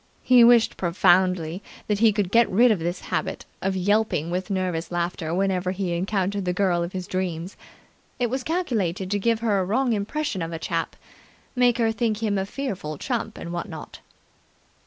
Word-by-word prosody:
He 250 -2 +6
wished 235 -1 +5
profoundly 175 0 +2 0.2
that 210 -1 -1
he 225 0 +5
could 200 -3 -1
get 235 +1 +4
rid 235 +5 +5
of 210 - +1
his 175 +2 -3
habit - - -3 0.2
of 190 0 -1
yelping 195 -4 +1
with 185 +3 -3
nervous 180 -4 -2
laughter 170 -2 -2
whenever 185 0 0
he 185 -1 -2
encountered 195 +2 -1
the 180 -1 -1
girl 180 -2 +1
of 170 +1 -3
his 185 -1 -4
dreams. 180 -1 -3 0.6
It 245 - +1
was 260 +1 -1
calculated 210 - -1
to 205 - +1
give 230 +2 +1
her 210 -4 +2
a - - +1
wrong 240 +6 +1
impression 215 - -2
of 165 0 -3
a 165 - -4
chap - - -3 0.6
make 245 -1 +3
her 225 -2 +2
think 225 -1 -1
him 205 -3 +1
a 190 - -3
fearful 195 - -4
chump 225 - -3
and 170 - -6
what 175 +4 -4
not! 160 -3 -9
195 Hz, 185 wpm, -24 LUFS, 175-225 Hz, 0.6 s, He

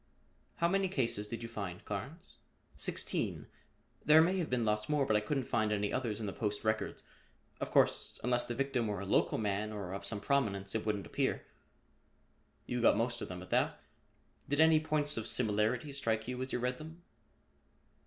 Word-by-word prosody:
"How 170 - +2
many 195 +2 +2
cases 120 - -1
did 115 +1 -5
you - - -4
find, 100 -4 -6
Carnes?" 130 - -6 0.4
"Sixteen. - - -1 0.6
There 150 +2 +7
may 180 +4 +4
have 170 - -2
been 125 -2 +1
lots 105 +2 0
more 150 -2 +2
but 110 - +2
I - - +5
couldn't 135 +6 -1
find 110 -2 0
any 105 -1 0
others 115 -5 -1
in 110 - -3
the 100 - -3
Post 105 -3 -2
records. 110 0 -1 0.6
Of - - -3
course, - - +2
unless 120 +1 +1
the 120 - -3
victim 135 -3 0
were 105 -3 -2
a 100 - -5
local 95 - +2
man, 105 0 -1
or 100 -4 -5
of 100 +1 -5
some 100 +1 -1
prominence, 100 -6 0
it 110 -1 -2
wouldn't 100 -4 -1
appear." - - -1 1.2
"You 125 -1 -2
got 115 - +5
most 120 +1 -1
of - - -4
them 90 0 -6
at - - -13
that. - - +1 0.7
Did 145 +1 0
any 160 0 +7
points 150 -2 0
of 110 - -3
similarity 115 +4 +1
strike 115 -5 -1
you 125 0 -3
as 130 - -2
you - - 0
read 125 +1 -2
them?" 160 +3 -10
115 Hz, 195 wpm, -33 LUFS, 105-140 Hz, 1.2 s, There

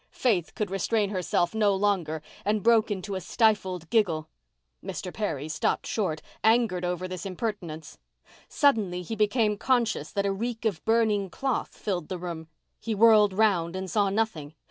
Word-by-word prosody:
Faith 195 -10 +1
could 210 -5 -2
restrain 200 +2 0
herself 180 -1 0
no 210 -2 +3
longer 180 -6 0 0.2
and 210 0 0
broke 230 -1 +4
into 200 0 -4
a 190 - -3
stifled 190 -4 +1
giggle. 170 -9 +1 0.6
Mr. 180 - -5
Perry 160 -9 -3
stopped 155 -1 -1
short, 180 -8 -2 0.2
angered 220 -5 +3
over 180 +1 -2
this 185 -2 -6
impertinence. 185 -6 -5 0.5
Suddenly 210 - +2
he 225 - -5
became 210 0 +2
conscious 230 - +1
that 200 0 -1
a 200 - +1
reek 230 +2 -4
of 195 -8 -1
burning 220 -4 +2
cloth 265 +7 -3
filled 180 -6 -3
the 185 - -3
room. 170 -2 -6 0.3
He 225 -2 -3
whirled 210 -1 +6
round 185 -4 +2
and 190 0 -4
saw 205 -2 +2
nothing. 195 -8 -2
200 Hz, 160 wpm, -27 LUFS, 180-220 Hz, 0.6 s, whirled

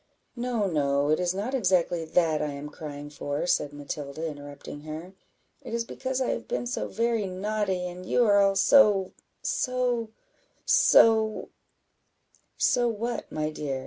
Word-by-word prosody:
"No, 240 -3 -1
no, 145 -4 +1
it 155 - +2
is 180 -1 +1
not 215 +7 -3
exactly 180 -7 +1
that 160 -1 +2
I 150 -1 -2
am 140 +1 -7
crying 145 -1 -8
for," 145 +1 -3
said 150 -4 +1
Matilda, 145 +1 -6
interrupting 145 -1 -8
her; 155 +4 -8 0.5
"it - - -5
is 230 0 -1
because 260 +2 -3
I 260 - 0
have - - -4
been - - -2
so 245 - -3
very 230 -1 0
naughty, 190 -1 -2
and 180 +1 -8
you 240 +6 +2
are 205 -2 +5
all 195 0 +3
so 205 -6 +5 0.3
so 250 - 0 0.6
so 220 - +4 0.5
" - - -40
"So 245 - +3
what, 235 +1 -3
my 155 0 -2
dear?" 140 -3 -3
185 Hz, 155 wpm, -27 LUFS, 150-230 Hz, 0.6 s, are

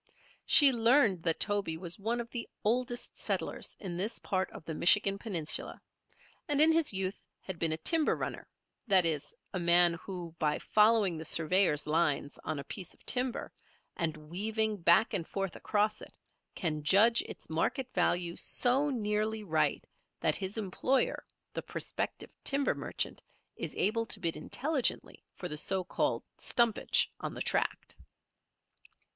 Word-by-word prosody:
She 285 -3 +8
learned 230 - +3
that 165 -1 +1
Toby 200 -6 +1
was 175 +2 -3
one 230 +4 -2
of 235 - -4
the 240 - -5
oldest 240 +2 -1
settlers - - -3
in 180 -4 -5
this 210 +6 -1
part 190 -2 -2
of - - -12
the 160 - -5
Michigan 195 +4 +4
Peninsula, 175 -9 +1 0.7
and 290 -2 +1
in 315 +2 +8
his 325 -2 +3
youth 190 0 -3 0.2
had 185 -3 -7
been 165 -1 0
a 160 - -1
timber 315 - +2
runner, - - -5 0.4
that 190 -4 +5
is, 150 -3 -1 0.2
a 185 - -2
man 175 0 +5
who 175 -1 -8
by 150 -1 +1
following 210 -5 +3
the - - -6
surveyors' 165 -1 +3
lines 150 -2 0
on 155 - -3
a 140 - -5
piece 180 +4 -7
of - - -29
timber, 250 0 -1 0.4
and 165 -4 -2
weaving 210 +7 -1
back 170 +5 +3
and 170 -4 -2
forth 195 -3 -4
across 210 0 -1
it, - - -11 0.4
can 155 -3 -2
judge 210 +9 +5
its - - -9
market 205 - -1
value 175 -1 +1
so 265 +4 +1
nearly 215 -3 -1
right 160 -5 0 0.3
that - - +1
his 195 +2 -4
employer, 220 +6 0 0.3
the - - -3
prospective - - -4
timber 280 0 +1
merchant, - - -3 0.3
is - - -3
able 230 +2 +1
to - - -5
bid 165 -1 0
intelligently 280 -2 -2
for 180 - -6
the 150 - -5
so 190 +4 0
called 180 - -1 0.2
"stumpage" 235 -3 +2
on - - -5
the - - -6
tract. - - -2
195 Hz, 155 wpm, -31 LUFS, 170-230 Hz, 0.7 s, She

